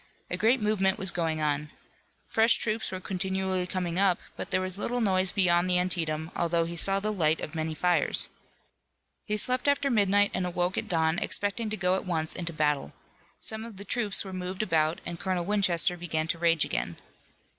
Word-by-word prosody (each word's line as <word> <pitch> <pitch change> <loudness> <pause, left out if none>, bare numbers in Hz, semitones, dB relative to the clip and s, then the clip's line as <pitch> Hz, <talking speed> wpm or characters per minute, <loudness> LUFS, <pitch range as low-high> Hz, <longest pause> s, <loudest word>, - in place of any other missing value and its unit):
A - - 0
great 235 +4 +2
movement 205 -3 +1
was 190 -2 +1
going 160 -3 -2
on. 150 0 -1 0.6
Fresh 225 +1 +4
troops 220 0 -2
were 185 - -4
continually 190 -1 -2
coming 180 -1 -2
up, 190 -3 +3 0.2
but - - -6
there - - +1
was 185 +1 -4
little 245 +3 -2
noise 190 -4 +2
beyond 180 -2 +3
the 180 - +3
Antietam, 165 -3 -1
although 170 -1 +1
he 170 +1 -6
saw 195 +3 +4
the 215 +2 -2
light 160 -5 +1
of 150 - -6
many 160 -1 -3
fires. 175 -2 +3 1.0
He 210 - 0
slept 250 +5 +1
after 285 -1 +2
midnight 205 -2 +3
and 185 0 -1
awoke 180 +1 -1
at - - -3
dawn, 160 -1 +1
expecting 205 +2 -1
to 215 - -3
go 180 -1 +1
at 190 - -1
once 160 -3 -1
into 170 -2 -3
battle. 150 - -1 0.5
Some 220 0 +1
of 225 -4 -10
the 200 - -9
troops 210 -2 +2
were 190 - -7
moved 185 +2 -4
about 160 -4 +1
and 170 -1 -5
Colonel 185 -2 -2
Winchester 185 -3 +3
began 160 -2 -2
to 170 - -1
rage 165 -2 +3
again. - - -3
185 Hz, 195 wpm, -28 LUFS, 165-200 Hz, 1.0 s, Fresh